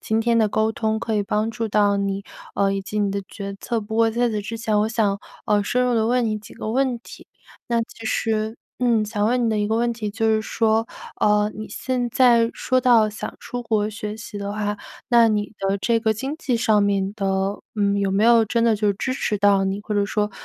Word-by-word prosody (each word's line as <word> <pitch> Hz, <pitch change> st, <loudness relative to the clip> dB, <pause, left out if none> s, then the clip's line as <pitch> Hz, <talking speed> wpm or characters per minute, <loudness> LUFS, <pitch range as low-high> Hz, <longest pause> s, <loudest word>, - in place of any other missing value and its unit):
今 220 Hz, 0 st, 0 dB
天 230 Hz, 0 st, +2 dB
的 220 Hz, -2 st, +3 dB
沟 220 Hz, +2 st, +1 dB
通， 220 Hz, 0 st, -1 dB
可 225 Hz, -1 st, -2 dB
以 205 Hz, -, +1 dB
帮 210 Hz, +2 st, 0 dB
助 230 Hz, 0 st, -3 dB
到 205 Hz, -1 st, +2 dB
你， 200 Hz, 0 st, -2 dB, 0.3 s
呃， 195 Hz, -1 st, +2 dB
以 195 Hz, -, -1 dB
及 205 Hz, +2 st, -5 dB
你 200 Hz, -1 st, +1 dB
的 200 Hz, 0 st, -2 dB
决 200 Hz, -1 st, -7 dB
策。 235 Hz, -2 st, -2 dB
不 220 Hz, +1 st, -5 dB
过 225 Hz, 0 st, +4 dB
在 240 Hz, +2 st, +1 dB
此 215 Hz, -1 st, -2 dB
之 225 Hz, +3 st, -5 dB
前 220 Hz, -2 st, 0 dB
我 215 Hz, -, +2 dB
想， 215 Hz, -3 st, 0 dB, 0.3 s
呃， 205 Hz, -1 st, +3 dB
深 250 Hz, +4 st, +1 dB
入 245 Hz, -, +1 dB
地 220 Hz, -1 st, +2 dB
问 245 Hz, +1 st, +2 dB
你 215 Hz, -1 st, -1 dB
几 210 Hz, -, -14 dB
个 215 Hz, -, -5 dB
问 255 Hz, 0 st, +1 dB
题。 -, -, -13 dB, 0.4 s
那 235 Hz, -1 st, +1 dB
其 225 Hz, 0 st, -9 dB
实， 220 Hz, 0 st, -1 dB, 0.2 s
嗯， 235 Hz, -3 st, +2 dB
想 210 Hz, -1 st, -1 dB
问 245 Hz, +2 st, +1 dB
你 -, -, +1 dB
的 215 Hz, -, 0 dB
一 205 Hz, -, +1 dB
个 220 Hz, -, +1 dB
问 235 Hz, +1 st, +1 dB
题 220 Hz, -3 st, -4 dB
就 225 Hz, +2 st, -1 dB
是 215 Hz, -, +1 dB
说， 225 Hz, 0 st, +1 dB, 0.3 s
呃， 210 Hz, 0 st, +3 dB
你 215 Hz, 0 st, -7 dB
现 250 Hz, -2 st, -2 dB
在 235 Hz, -2 st, +4 dB
说 255 Hz, 0 st, +1 dB
到 235 Hz, -4 st, +5 dB
想 215 Hz, 0 st, -6 dB
出 245 Hz, 0 st, -6 dB
国 215 Hz, -2 st, 0 dB
学 210 Hz, 0 st, -6 dB
习 220 Hz, -1 st, -8 dB
的 200 Hz, 0 st, -4 dB
话， 210 Hz, 0 st, -2 dB, 0.3 s
那 235 Hz, -3 st, +6 dB
你 210 Hz, -1 st, -1 dB
的 195 Hz, 0 st, 0 dB
这 230 Hz, +3 st, +1 dB
个 220 Hz, -1 st, +2 dB
经 265 Hz, +7 st, -4 dB
济 255 Hz, -6 st, -1 dB
上 215 Hz, -3 st, +3 dB
面 200 Hz, -1 st, 0 dB
的， 200 Hz, -2 st, -3 dB
呃， 195 Hz, +1 st, -1 dB, 0.4 s
有 195 Hz, -, +1 dB
没 200 Hz, +3 st, +2 dB
有 230 Hz, -1 st, +6 dB
真 230 Hz, +2 st, +1 dB
的 230 Hz, -1 st, +4 dB
就 210 Hz, 0 st, 0 dB
是 200 Hz, -, +1 dB
支 255 Hz, +6 st, -2 dB
持 215 Hz, -5 st, -1 dB
到 200 Hz, -1 st, +3 dB
你， 195 Hz, +1 st, -1 dB
或 210 Hz, -, -4 dB
者 205 Hz, -1 st, +1 dB
说， 210 Hz, 0 st, -1 dB
220 Hz, 260 characters per minute, -22 LUFS, 205-230 Hz, 0.4 s, 那